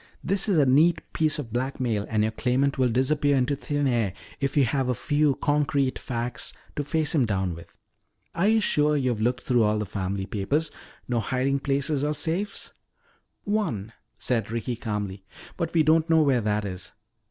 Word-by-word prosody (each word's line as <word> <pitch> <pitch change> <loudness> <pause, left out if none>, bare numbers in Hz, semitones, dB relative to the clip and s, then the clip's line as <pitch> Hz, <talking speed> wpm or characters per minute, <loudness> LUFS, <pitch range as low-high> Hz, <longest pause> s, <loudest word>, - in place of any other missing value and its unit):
This 195 +3 +1
is 190 - +3
a 145 - +5
neat 155 +6 +4
piece 155 -1 +2
of 120 -7 -6
blackmail 120 -4 -1
and 110 -1 +1
your 110 - 0
claimant 130 +4 0
will 130 -1 +3
disappear 140 +4 +2
into 130 +2 +1
thin 145 +1 -2
air 115 -7 +1 0.3
if 140 0 -1
you 140 - +6
have 130 +1 0
a 125 - +1
few 145 -1 +1
concrete 145 -2 0
facts 120 -1 -3 0.2
to 145 - -1
face 155 +1 0
him 145 -5 +3
down 95 -4 -1
with. 85 0 -13 0.6
Are 180 +4 +1
you 220 0 +4
sure 150 -5 +2
you've 125 -5 0
looked 125 +2 0
through 120 -2 +2
all 105 0 +2
the 105 - -2
family 95 0 -3
papers? 140 +12 -1 0.4
No 120 -2 0
hiding 130 +4 0
places 140 +1 0
or 150 +1 0
safes 170 +7 -3 0.4
" - - -42
"One," 155 - -2 0.2
said 115 -5 0
Ricky 115 +1 -3
calmly, 105 -4 -4 0.3
"but 165 -2 -2
we 165 -2 +3
don't 160 +2 +3
know 160 -1 +5
where 135 -4 +2
that 105 0 0
is. 90 -2 -7
130 Hz, 185 wpm, -26 LUFS, 110-150 Hz, 0.6 s, you